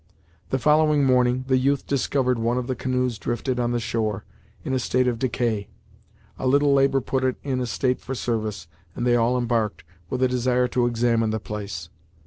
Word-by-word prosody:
The 135 - +1
following 150 +2 +3
morning, 125 0 +2
the 130 -1 +3
youth 140 +1 +1
discovered 130 -2 0
one 115 +2 0
of 125 - -1
the 130 - -2
canoes 125 -2 -1
drifted 125 +1 -2
on 120 0 0
the 120 - 0
shore, 110 -3 -2 0.4
in 130 - -2
a 130 - +1
state 125 +1 +1
of 120 -2 -1
decay. 115 -4 -1 0.7
A 130 - -1
little 140 +2 +4
labor 135 0 +3
put 130 +1 -1
it 130 -1 +1
in 130 -2 -1
a 125 - -2
state 125 +1 0
for 135 - -5
service, 110 -7 -2 0.3
and 120 - -2
they 120 -1 +4
all 120 +2 +2
embarked, 115 -3 -1 0.3
with 130 0 -1
a - - +5
desire 125 0 +1
to 120 0 +1
examine 115 -1 +1
the 110 0 -1
place. 100 -6 -6
125 Hz, 195 wpm, -24 LUFS, 115-130 Hz, 0.7 s, a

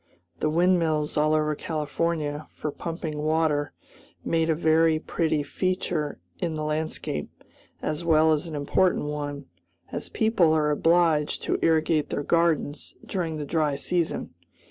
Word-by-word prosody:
The 155 - +1
windmills 165 -2 +2
all 155 +1 +3
over 155 0 +1
California, 155 0 -2
for 150 - -3
pumping 160 -1 -5
water, 155 -1 +1 0.5
make 165 0 +1
a 160 - +3
very 160 0 +3
pretty 155 -1 -1
feature 165 - -2 0.2
in 165 -2 -2
the 155 - -3
landscape, 155 - -3 0.5
as 155 +2 -2
well 160 -1 +4
as 155 +2 0
an 160 - -6
important 150 +1 +1
one, 145 -1 -4 0.5
as - - -5
people 220 -8 +3
are 150 -1 +2
obliged 165 -1 +2
to - - 0
irrigate 160 -1 +2
their 145 - -2
gardens 165 -2 0
during 165 -5 -2
the 150 - -4
dry 150 -1 +1
season. 170 +4 -2
155 Hz, 140 wpm, -26 LUFS, 150-165 Hz, 0.5 s, well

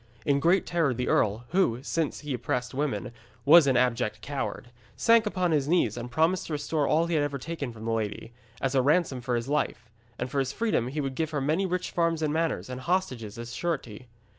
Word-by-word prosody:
In 140 -1 +3
great 175 +5 +3
terror 160 -7 +1
the 125 +1 -2
earl, 110 +3 +2
who, 130 -10 +1
since 160 0 -2
he 150 -2 -4
oppressed 125 +1 -2
women, 135 -3 -2 0.3
was 155 +1 +8
an 130 -2 +3
abject 115 -4 +1
coward, 135 -2 -5 0.2
sank 230 -1 +4
upon 185 -4 0
his 145 -3 +1
knees 155 - +2
and 120 0 -6
promised 160 +8 +1
to 160 - -4
restore 150 0 0
all 160 +2 +3
he 170 - -2
had 155 - +3
ever 145 -1 -2
taken 145 -2 -5
from 110 -1 -10
the 115 - -1
lady, 110 +1 -3 0.3
as 135 0 -1
a 135 - +4
ransom 145 -2 +2
for 120 0 -1
his 120 +1 -2
life; 125 -5 -2 0.3
and 125 +1 -4
for 140 - 0
his 135 0 -1
freedom 215 - 0
he 145 +4 -3
would 135 -1 -3
give 160 +3 -1
her 150 -2 -2
many 155 +8 +1
rich 180 0 -2
farms 165 -2 +1
and 150 -1 0
manors, 165 0 -1
and 130 0 -6
hostages 130 - -2
as 120 +1 -7
surety. 130 -9 -4
140 Hz, 220 wpm, -27 LUFS, 125-165 Hz, 0.3 s, was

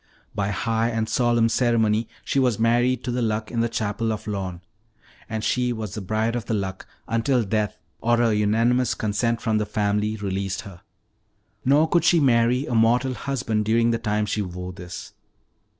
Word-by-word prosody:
By 100 -1 -1
high 115 +4 0
and 115 -1 -1
solemn 120 -1 +2
ceremony 115 -2 +2 0.2
she 140 - +1
was 125 -5 +2
married 120 +2 +2
to 125 - -2
the 125 +1 -1
Luck 110 -1 -1
in 120 - -2
the 115 0 +1
chapel 110 0 -1
of 110 - -4
Lorne. 95 -4 -4 0.7
And 110 -1 -3
she 125 -1 +1
was 110 -4 -5
the 105 - -4
Bride 110 +4 -1
of 120 -2 -3
the 115 - -1
Luck 95 -2 -4 0.2
until 115 +2 +1
death 105 0 -1 0.2
or 120 0 +2
a 115 -2 +3
unanimous 115 +4 +2
consent 115 +2 -1
from 110 -2 +1
the 105 - 0
family 105 +1 0
released 100 -2 -3
her. 95 -3 -12 0.8
Nor 145 +5 +4
could 170 0 +2
she 175 -1 +5
marry 125 -1 +3
a 125 - -4
mortal 120 +3 +3
husband 125 -5 -2
during 115 +2 +3
the 115 - 0
time 105 -2 0
she 105 +1 -1
wore 90 -1 -6
this." 90 0 -9
115 Hz, 180 wpm, -24 LUFS, 105-120 Hz, 0.8 s, she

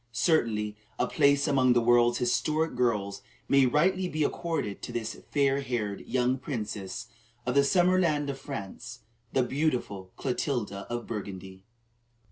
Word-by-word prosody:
Certainly 110 -9 +1 0.2
a - - +2
place 140 -2 +3
among 130 -3 +4
the 120 - +4
world's 120 0 +4
historic 155 +6 +1
girls 105 -5 0 0.3
may 140 -1 +5
rightly 185 +8 +2
be 155 -1 0
accorded 160 - -2
to - - -6
this 115 -1 -3 0.2
fair 140 -1 +2
haired 115 -7 -3
young 125 +1 +1
princess 105 -7 -5 0.4
of 125 - 0
the 140 - +5
summer 180 +5 +4
land 150 -5 +1
of 135 - -8
France, 120 -2 -7 0.3
the 130 - +2
beautiful 125 -9 -2
Clotilda 125 -6 -2
of 120 0 -3
Burgundy. 95 -3 -7
125 Hz, 140 wpm, -28 LUFS, 110-145 Hz, 0.4 s, may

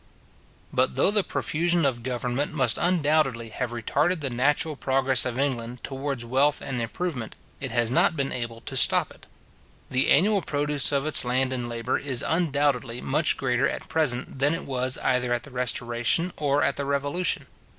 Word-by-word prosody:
But 65 - +1
though - - +3
the 205 -1 +3
profusion 170 0 0
of 125 -4 0
government 125 +4 -2
must 130 -7 +2
undoubtedly 150 -9 +1
have 125 +2 -3
retarded 145 +9 0
the 135 -3 -3
natural 145 +5 +1
progress 130 -2 +2
of 125 -1 -3
England 125 -3 -2
towards 135 -2 -4
wealth 135 +5 +2
and 130 -3 -4
improvement, 125 0 -4 0.2
it 130 - -4
has 120 -1 0
not 130 - +3
been 140 -2 -2
able 115 -2 -5
to - - -7
stop - - +4
it. - - -17 0.6
The 130 0 +2
annual 200 +5 +4
produce 145 -2 -1
of 140 0 0
its 155 - +4
land 130 +1 +1
and 120 -2 -3
labour 115 -1 -2
is 130 -4 0
undoubtedly 140 -7 0
much 150 +4 +1
greater 130 +1 +1
at - - -5
present 135 -5 0
than 145 +4 +2
it 165 - -6
was 130 -1 -1
either 125 -1 +1
at 120 0 -2
the 140 - -10
Restoration 120 +6 0
or 145 -1 +1
at 140 - 0
the 140 - -2
Revolution. 145 +6 0
135 Hz, 175 wpm, -25 LUFS, 125-150 Hz, 0.6 s, stop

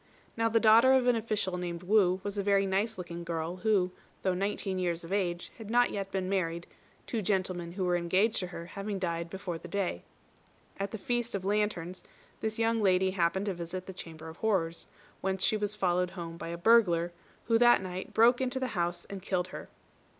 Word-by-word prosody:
Now 230 0 +2
the 225 0 +3
daughter 230 +4 +7
of 260 -2 +4
an 245 -1 +4
official 215 -5 -1
named 175 -1 -4
Wu 185 -1 +3
was 205 0 -4
a 200 - 0
very 200 0 +3
nice 200 +3 0
looking 170 -1 -6
girl 170 +1 -3
who, 190 -3 +2 0.3
though 185 - +2
nineteen 195 0 -2
years 175 -2 -1
of 165 +3 -5
age, 175 -3 -1
had 220 -2 -8
not 245 +1 +4
yet 195 -1 -3
been 190 -1 -1
married, 170 -3 -1 0.4
two 230 - -2
gentlemen 185 -3 -1
who 185 0 -2
were 180 0 +2
engaged 185 +6 +2
to 180 - -1
her 170 -1 -7
having 200 +3 -4
died 170 -2 -2
before 180 -2 -5
the 175 - -9
day. 180 - -2 0.8
At 200 0 -1
the 220 - -5
Feast 240 +1 -2
of 190 -1 -4
Lanterns, 195 -4 -1 0.4
this 220 0 -2
young 225 0 +2
lady 190 -1 +3
happened 185 +1 +1
to 200 - -1
visit 175 +1 -6
the 190 - -7
Chamber 160 -3 -9
of 160 +1 -9
Horrors, 175 -7 0 0.3
whence 190 0 -1
she - - +3
was 210 0 -1
followed 180 -2 +1
home 170 -2 -7
by 165 - -7
a 170 0 -4
burglar, 175 -4 +4 0.3
who 230 -1 +3
that 240 -4 +6
night 185 0 -5
broke 240 +3 +5
into 260 0 -1
the 260 -1 -1
house 175 -2 -1
and 195 -1 -7
killed 185 -1 -1
her. - - -8
190 Hz, 210 wpm, -30 LUFS, 175-215 Hz, 0.8 s, daughter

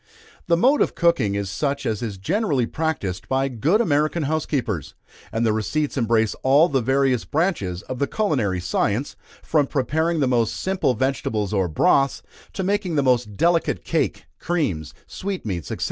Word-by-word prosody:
The 170 -1 +3
mode 265 - +4
of - - +1
cooking 170 - +2
is 100 -1 -2
such 140 +9 -2
as 110 -2 -1
is 110 -5 -4
generally 140 - 0
practised 130 - -3
by 135 +1 +1
good 145 - +1
American 155 -5 +1
housekeepers, 135 - -2 0.4
and 115 +1 0
the 110 - +2
receipts 145 +8 -1
embrace 115 -4 +2
all 140 +5 +5
the 135 -2 +1
various 130 -1 +2
branches 105 - -1
of 130 - -6
the 140 - +1
culinary 125 - 0
science, 105 +7 -1 0.3
from 150 -3 +2
preparing 160 +5 0
the 135 - +2
most 120 -3 +1
simple 190 -9 0
vegetables 115 -5 -1
or 95 -3 +1
broths, 135 - +2 0.3
to 190 - -3
making 195 -3 0
the 145 - +2
most 120 -6 +1
delicate 170 0 +1
cake, - - -1
creams, 125 - -2
sweetmeats, 110 - -4
&c. - - -3
135 Hz, 160 wpm, -23 LUFS, 110-160 Hz, 0.4 s, all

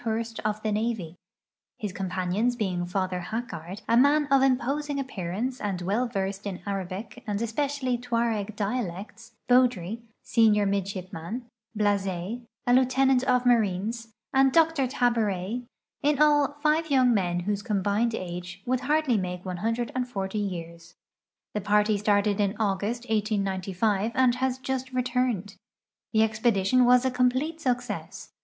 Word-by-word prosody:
Hourst 225 0 -2
of 215 0 -2
the 215 - 0
navy, 210 -6 -2 0.6
his 205 -4 -4
companions 190 +5 -1
being 185 -6 -2
Father 185 0 -1
Hacquard, 210 -4 -5
a 230 - +3
man 285 +4 +5
of 275 -1 +6
imposing 275 +2 +1
appearance 240 0 -3
and 200 -3 -2
well 210 +7 0
versed 195 -2 -3
in 190 -2 -4
Arabic 200 +5 -5
and 205 -1 -1
especially 255 +2 -1
Tuareg 230 -4 -1
dialects; 210 +1 -4
Beaudry, 235 -5 +2 0.2
senior 215 -3 +4
midshipman; 195 +2 -3 0.3
Bluzet, 200 +1 0 0.2
a 245 - +3
lieu 260 +1 +6
tenant 265 0 +3
of 250 -1 +2
marines, 225 0 +1 0.3
and 270 0 +5
Dr 325 -3 +3
Taburet; 230 -2 0 0.3
in 290 0 +2
all 290 -1 +4
five 315 +1 +2
young 255 -3 +4
men 175 -4 0
whose 205 +2 -1
combined 210 +1 0
ages 180 -1 -6
would 255 +1 +1
hardly 285 -2 +2
make 180 -1 -4
140 220 +1 -2
years. 170 -3 -6 0.6
The 210 - -2
party 210 +1 +2
started 205 0 +2
in 200 0 +1
August, 210 +3 -1
1895, 205 -1 0
and 255 -2 +4
has 255 +1 -1
just 260 0 -3
returned. 250 -5 -1 0.5
The 220 - +3
expedi 220 -2 +2
tion 250 +5 +4
was 250 +1 +5
a 260 - +2
complete 255 +6 0
success. 245 -3 -3
220 Hz, 135 wpm, -27 LUFS, 195-250 Hz, 0.6 s, of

